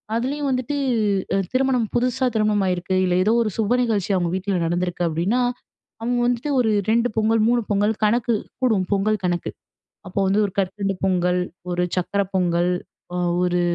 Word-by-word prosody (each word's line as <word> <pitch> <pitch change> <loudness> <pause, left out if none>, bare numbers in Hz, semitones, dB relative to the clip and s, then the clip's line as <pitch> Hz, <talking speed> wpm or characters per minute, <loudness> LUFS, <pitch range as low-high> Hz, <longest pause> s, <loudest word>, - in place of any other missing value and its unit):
அதுலேயும் 275 +5 -1
வந்துட்டு, 255 +2 -1 0.8
திருமணம் 255 -3 +2
புதுசா 250 +1 +1
திருமணம் 210 -2 +2
ஆயிருக்கு, 180 +1 -1
இல்ல 180 -1 +1
ஏதோ 215 - +3
ஒரு 220 - -1
சுப 215 -1 0
நிகழ்ச்சி 210 -5 0
அவங்க 175 -2 0
வீட்ல 190 +1 -2
நடந்திருக்கு 175 +1 -1
அப்படீன்னா, 180 +10 0 0.6
அவங்க 245 +2 0
வந்துட்டு 245 +4 -1
ஒரு 225 -3 +2 0.2
2 235 +2 +3
பொங்கல் 220 0 +3
3 240 0 +2
பொங்கல் 205 +2 +2
கணக்கு 235 +2 +2 0.3
கூடும். 220 -7 +2
பொங்கல் 205 +1 +1
கணக்கு. 175 -1 -1 0.6
அப்போ 185 - -3
வந்து 195 +2 +2
1 200 - -4
கற்கண்டு 195 +1 -1
பொங்கல், 180 -1 +1 0.3
1 175 0 0
சக்கரை 200 +2 0
பொங்கல், 175 -1 +2 0.4
அ - - -1 0.3
1 180 0 +1
205 Hz, 155 wpm, -22 LUFS, 180-235 Hz, 0.8 s, ஏதோ